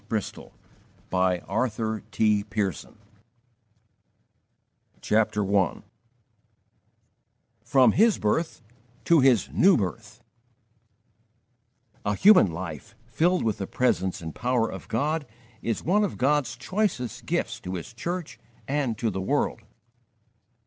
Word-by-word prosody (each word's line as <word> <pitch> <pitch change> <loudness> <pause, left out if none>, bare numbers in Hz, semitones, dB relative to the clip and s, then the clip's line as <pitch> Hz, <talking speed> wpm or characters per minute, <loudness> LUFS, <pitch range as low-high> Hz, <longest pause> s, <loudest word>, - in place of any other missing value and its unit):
George 110 -3 -2
Muller - - -13 0.9
of 110 -2 -1
Bristol 100 -8 -2 2.1
CHAPTER 105 -2 +1
I 95 -5 +1 1.8
FROM 125 0 +4
HIS 220 - +4
BIRTH 125 +6 -1 0.4
TO 170 -2 +5
HIS 130 -5 +4
NEW 190 +1 +5
BIRTH 95 -7 -5 1.8
A 105 0 0
HUMAN 195 - +6
life, 80 -4 -7
filled 170 +10 +1
with 110 -3 -1
the 95 - -3
presence 95 -9 0
and 80 -1 -6
power 120 -2 0
of - - -9
God, 150 +5 -1 0.3
is 115 -2 -2
one 205 +5 +2
of 200 - -2
God's 135 -3 +1
choicest 185 - -2
gifts - - -1
to 90 +1 -6
His 90 +5 -7
church 175 +7 -5 0.3
and 135 -5 -1
to 115 -1 -1
the 95 0 -4
world. 125 +1 -1
115 Hz, 105 wpm, -26 LUFS, 105-145 Hz, 2.1 s, HUMAN